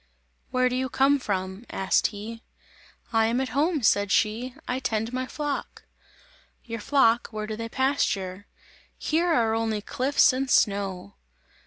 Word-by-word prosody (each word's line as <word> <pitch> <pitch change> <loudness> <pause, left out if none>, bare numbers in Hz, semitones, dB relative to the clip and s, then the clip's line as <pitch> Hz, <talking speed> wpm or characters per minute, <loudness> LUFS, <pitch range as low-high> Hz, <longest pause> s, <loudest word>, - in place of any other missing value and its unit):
"Where 255 0 +2
do 250 - -1
you 260 0 -1
come 275 +3 +3
from?" 190 -2 -3
asked 190 -1 +2
he. 220 +2 -8 0.7
"I 225 0 +4
am 235 +3 0
at 265 -1 -1
home," 295 +3 0
said 205 -2 +3
she, 230 +6 +1
"I 250 +1 -1
tend 225 -1 -2
my 255 0 -2
flock!" 290 0 -4 0.8
"Your 230 -1 -5
flock, 235 -1 +3
where 215 -1 -5
do 215 0 -4
they 230 +1 -5
pasture? 200 -8 -1 0.5
Here 330 +3 0
are 230 -7 +2
only 225 -1 0
cliffs 255 +6 +2
and 265 +1 -2
snow!" 195 - +1
230 Hz, 150 wpm, -26 LUFS, 210-260 Hz, 0.8 s, I